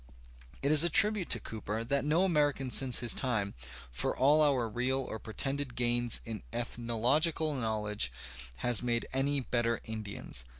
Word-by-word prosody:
It 140 Hz, -, +2 dB
is 155 Hz, +1 st, +8 dB
a 170 Hz, -, +3 dB
tribute 210 Hz, -3 st, +4 dB
to -, -, +2 dB
Cooper 110 Hz, 0 st, -5 dB
that 140 Hz, +3 st, -1 dB
no 155 Hz, +5 st, +1 dB
American 145 Hz, -7 st, 0 dB
since 130 Hz, -2 st, +2 dB
his 120 Hz, -, +4 dB
time, 110 Hz, -6 st, -2 dB, 0.4 s
for -, -, -1 dB
all 145 Hz, +4 st, +4 dB
our 135 Hz, -6 st, +2 dB
real 125 Hz, +4 st, 0 dB
or 110 Hz, -4 st, -6 dB
pretended 135 Hz, +4 st, -4 dB
gains 120 Hz, -1 st, +2 dB
in 110 Hz, -2 st, -6 dB
ethnological 120 Hz, +7 st, 0 dB
knowledge, 105 Hz, -, -2 dB, 0.5 s
has 120 Hz, -3 st, +4 dB
made 120 Hz, -1 st, 0 dB
any 140 Hz, +1 st, +1 dB
better 120 Hz, -2 st, -1 dB
Indians. 105 Hz, -, -4 dB
125 Hz, 155 wpm, -30 LUFS, 115-145 Hz, 0.5 s, is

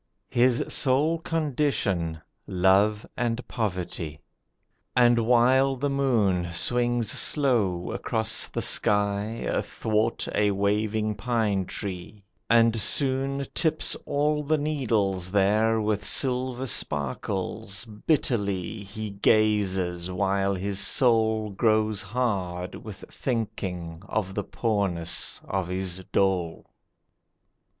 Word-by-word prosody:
His 125 Hz, 0 st, +3 dB
sole 150 Hz, +5 st, +2 dB
condition 135 Hz, -, -1 dB, 0.3 s
Love 95 Hz, +3 st, +3 dB
and 120 Hz, 0 st, -2 dB
poverty. 90 Hz, -7 st, -3 dB, 0.8 s
And 120 Hz, -1 st, +5 dB
while 130 Hz, +3 st, +4 dB
the 140 Hz, +2 st, -2 dB
moon 110 Hz, -10 st, +1 dB
Swings 120 Hz, +5 st, 0 dB
slow 110 Hz, -, +1 dB
across 110 Hz, -2 st, 0 dB
the -, -, -3 dB
sky, 105 Hz, +2 st, +1 dB
Athwart 110 Hz, +1 st, -1 dB
a 105 Hz, 0 st, +2 dB
waving 105 Hz, +2 st, 0 dB
pine 105 Hz, -3 st, 0 dB
tree, 100 Hz, +1 st, -7 dB, 0.3 s
And 115 Hz, -1 st, +5 dB
soon 135 Hz, +1 st, 0 dB
Tips 160 Hz, -1 st, +1 dB
all 150 Hz, +1 st, +1 dB
the 155 Hz, +2 st, +1 dB
needles 110 Hz, -11 st, 0 dB
there 105 Hz, +3 st, +3 dB
With 105 Hz, -1 st, -1 dB
silver 130 Hz, +1 st, 0 dB
sparkles, 95 Hz, -, -2 dB
bitterly 105 Hz, -, -1 dB
He 105 Hz, +1 st, -6 dB
gazes, 100 Hz, -4 st, +1 dB
while 95 Hz, +1 st, 0 dB
his 100 Hz, +1 st, -2 dB
soul 110 Hz, -4 st, +2 dB
Grows 110 Hz, 0 st, +1 dB
hard 95 Hz, -5 st, -2 dB
with 105 Hz, -3 st, -9 dB
thinking 90 Hz, -9 st, -4 dB
of 95 Hz, -3 st, -2 dB
the 105 Hz, -, -2 dB
poorness 95 Hz, -7 st, -1 dB
of 95 Hz, -2 st, -2 dB
his 95 Hz, 0 st, -3 dB
dole. 90 Hz, -4 st, 0 dB
105 Hz, 100 wpm, -26 LUFS, 95-120 Hz, 0.8 s, And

